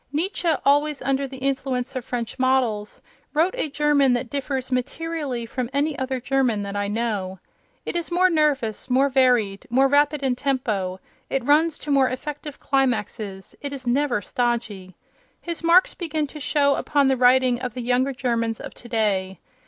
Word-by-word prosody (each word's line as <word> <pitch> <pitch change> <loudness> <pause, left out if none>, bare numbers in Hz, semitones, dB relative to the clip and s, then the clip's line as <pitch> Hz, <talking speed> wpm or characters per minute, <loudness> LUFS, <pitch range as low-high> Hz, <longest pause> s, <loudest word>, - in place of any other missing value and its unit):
Nietzsche, 340 +3 -1 0.2
always 290 +1 +3
under 275 0 0
the 265 0 -9
influence 265 -1 -2
of 255 - -3
French 240 +1 -4
models, 250 -5 0 0.3
wrote 330 +5 +3
a 410 -11 -1
German 285 -2 +3
that 245 -1 -2
differs 270 -2 -3
materially 275 -1 -2
from 245 +1 -4
any 290 +2 +1
other 260 0 -2
German 250 -5 0
that 200 0 -5
I 205 0 -1
know. 205 -4 -2 0.5
It - - -4
is 345 -1 -2
more 360 +2 +4
nervous, 295 - 0
more 265 +3 +3
varied, 245 -7 +2
more 265 +3 +4
rapid 290 +1 +2
in 260 -2 +1
tempo; 220 -9 -1 0.3
it 270 -3 -1
runs 310 +3 +3
to 295 - -5
more 270 -2 +4
effective 295 +2 -6
climaxes; 220 -7 -2
it 285 -1 -4
is 265 -2 -7
never 245 -3 +1
stodgy. 225 -6 -2 0.4
His 340 -1 -5
marks 340 +3 +5
begin 315 -3 -2
to 300 +2 -10
show 285 -1 +2
upon 285 0 +1
the 265 - +3
writing 255 0 +4
of 250 -2 -5
the 250 - -4
younger 250 +3 +1
Germans 235 -4 -1
of - - -8
today. 205 -5 -1
260 Hz, 170 wpm, -23 LUFS, 235-285 Hz, 0.5 s, marks